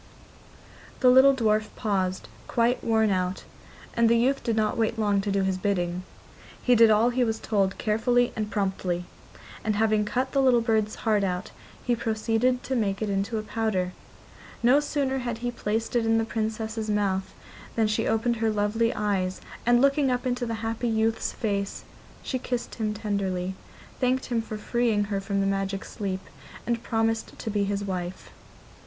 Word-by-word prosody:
The 250 Hz, -2 st, +7 dB
little 265 Hz, +2 st, +7 dB
dwarf 215 Hz, -3 st, +2 dB
paused, 190 Hz, -3 st, -1 dB, 0.2 s
quite 240 Hz, +1 st, +1 dB
worn 220 Hz, -2 st, +2 dB
out, 185 Hz, 0 st, -1 dB, 0.5 s
and 235 Hz, -1 st, +3 dB
the 235 Hz, -, +5 dB
youth 265 Hz, +4 st, +2 dB
did 230 Hz, -3 st, -1 dB
not 215 Hz, -1 st, +1 dB
wait 225 Hz, 0 st, 0 dB
long 205 Hz, -2 st, +2 dB
to 200 Hz, 0 st, -2 dB
do 195 Hz, 0 st, +1 dB
his 190 Hz, -1 st, 0 dB
bidding. 180 Hz, -2 st, -1 dB, 0.6 s
He 250 Hz, -, +3 dB
did 230 Hz, -1 st, +7 dB
all 220 Hz, +3 st, +4 dB
he 250 Hz, +1 st, +1 dB
was 225 Hz, -2 st, 0 dB
told 195 Hz, -3 st, 0 dB
carefully 240 Hz, +2 st, +2 dB
and 215 Hz, -1 st, -2 dB
promptly, 190 Hz, -4 st, -1 dB, 0.6 s
and 215 Hz, -1 st, 0 dB
having 215 Hz, 0 st, +2 dB
cut 255 Hz, +5 st, -1 dB
the 275 Hz, -, +2 dB
little 255 Hz, -3 st, +5 dB
bird's 220 Hz, -2 st, +1 dB
heart 210 Hz, -2 st, +3 dB
out 180 Hz, 0 st, -2 dB, 0.3 s
he 245 Hz, -, +2 dB
proceeded 230 Hz, +2 st, 0 dB
to 265 Hz, -, -2 dB
make 205 Hz, -3 st, 0 dB
it 210 Hz, -, -1 dB
into 200 Hz, +3 st, -1 dB
a 215 Hz, -, -3 dB
powder. 215 Hz, -5 st, -1 dB, 0.7 s
No 250 Hz, +4 st, +6 dB
sooner 280 Hz, -2 st, -1 dB
had 240 Hz, -3 st, -3 dB
he 245 Hz, -, 0 dB
placed 225 Hz, 0 st, -2 dB
it 235 Hz, -, +3 dB
in 225 Hz, 0 st, +3 dB
the 225 Hz, -, +1 dB
Princess's 220 Hz, 0 st, -3 dB
mouth 195 Hz, -2 st, 0 dB, 0.4 s
than 225 Hz, -, +3 dB
she 215 Hz, +1 st, 0 dB
opened 230 Hz, +2 st, +1 dB
her 225 Hz, 0 st, +1 dB
lovely 215 Hz, +2 st, +1 dB
eyes, 195 Hz, -3 st, -1 dB, 0.3 s
and, 240 Hz, 0 st, +6 dB
looking 275 Hz, 0 st, +3 dB
up 250 Hz, +1 st, -1 dB
into 245 Hz, -1 st, -1 dB
the 230 Hz, -, -2 dB
happy 225 Hz, +1 st, -1 dB
youth's 225 Hz, 0 st, 0 dB
face, 200 Hz, -3 st, -2 dB, 0.4 s
she 260 Hz, -, -2 dB
kissed 245 Hz, -1 st, -3 dB
him 215 Hz, -2 st, -2 dB
tenderly, 195 Hz, -4 st, -2 dB, 0.5 s
thanked 255 Hz, 0 st, +1 dB
him 235 Hz, -2 st, 0 dB
for 220 Hz, -1 st, -6 dB
freeing 225 Hz, -1 st, +1 dB
her 195 Hz, -, 0 dB
from 200 Hz, 0 st, -1 dB
her -, -, +1 dB
magic 195 Hz, 0 st, -1 dB
sleep, 190 Hz, -2 st, -4 dB, 0.4 s
and 235 Hz, -1 st, -1 dB
promised 225 Hz, -1 st, -1 dB
to 220 Hz, -, -4 dB
be 205 Hz, -1 st, +1 dB
his 200 Hz, 0 st, -2 dB
wife. 185 Hz, -2 st, -5 dB
220 Hz, 180 wpm, -26 LUFS, 200-235 Hz, 0.7 s, The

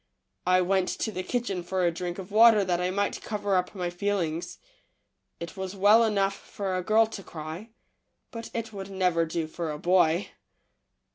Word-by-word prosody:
I 185 Hz, 0 st, +5 dB
went 185 Hz, 0 st, +1 dB
to 220 Hz, -, -2 dB
the 185 Hz, -, -4 dB
kitchen 200 Hz, -2 st, -2 dB
for 180 Hz, +1 st, -1 dB
a 170 Hz, -, +3 dB
drink 175 Hz, +1 st, -5 dB
of 190 Hz, +1 st, -8 dB
water 220 Hz, -1 st, +7 dB
that 180 Hz, -1 st, 0 dB
I 180 Hz, -, 0 dB
might 200 Hz, +2 st, -1 dB
cover 205 Hz, -2 st, -1 dB
up 180 Hz, +2 st, -1 dB
my 180 Hz, -2 st, -2 dB
feelings. 175 Hz, -3 st, -2 dB, 0.8 s
It 170 Hz, +2 st, -7 dB
was 190 Hz, 0 st, -5 dB
well 205 Hz, +4 st, +6 dB
enough 200 Hz, -3 st, +1 dB
for 195 Hz, -1 st, -5 dB
a 185 Hz, -, -1 dB
girl 220 Hz, +4 st, +4 dB
to 220 Hz, -2 st, -8 dB
cry, 165 Hz, +5 st, -8 dB, 0.6 s
but 230 Hz, -1 st, -7 dB
it 230 Hz, -1 st, -3 dB
w^ould 195 Hz, -2 st, -7 dB
never 180 Hz, -4 st, +1 dB
do 160 Hz, 0 st, -2 dB
for 160 Hz, +1 st, -5 dB
a 150 Hz, -, -5 dB
boy. 175 Hz, +1 st, +2 dB
185 Hz, 185 wpm, -27 LUFS, 175-205 Hz, 0.8 s, water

